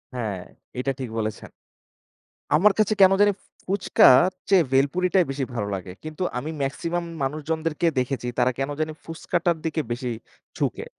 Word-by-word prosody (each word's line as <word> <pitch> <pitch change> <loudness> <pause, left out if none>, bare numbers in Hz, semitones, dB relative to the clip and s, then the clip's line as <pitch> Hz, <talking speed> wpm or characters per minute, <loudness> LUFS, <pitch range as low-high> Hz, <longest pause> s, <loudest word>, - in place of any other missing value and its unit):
হ্যাঁ, 105 -6 -3 0.4
এটা 135 +2 0
ঠিক 130 -3 -4
বলেছেন। 110 -1 -4 1.1
আমার 205 +6 +5
কাছে 215 0 +3
কেনো 195 0 +7
জানি 205 0 +5
ফু - - -29 0.2
ফুচকার 180 -5 +5 0.2
চেয়ে 190 -4 +5
বেলপুরিটায় 175 +7 +2
বেশি 135 0 -2
ভালো 105 -3 -2
লাগে। 90 -1 -6
কিন্তু 155 +3 -6 0.2
আমি 150 +5 -4
maximum 170 +5 -2 0.2
মানুষজনদেরকে 155 +3 -2
দেখেছি 125 -1 -2
তারা 125 +1 +3
কেনো 135 +2 -2
জানি 155 0 -1
ফুচকাটার 170 +1 -1
দিকে 160 0 -1
বেশি 125 +1 -3 0.5
ঝুঁকে। - - -2
155 Hz, 145 wpm, -24 LUFS, 130-175 Hz, 1.1 s, কেনো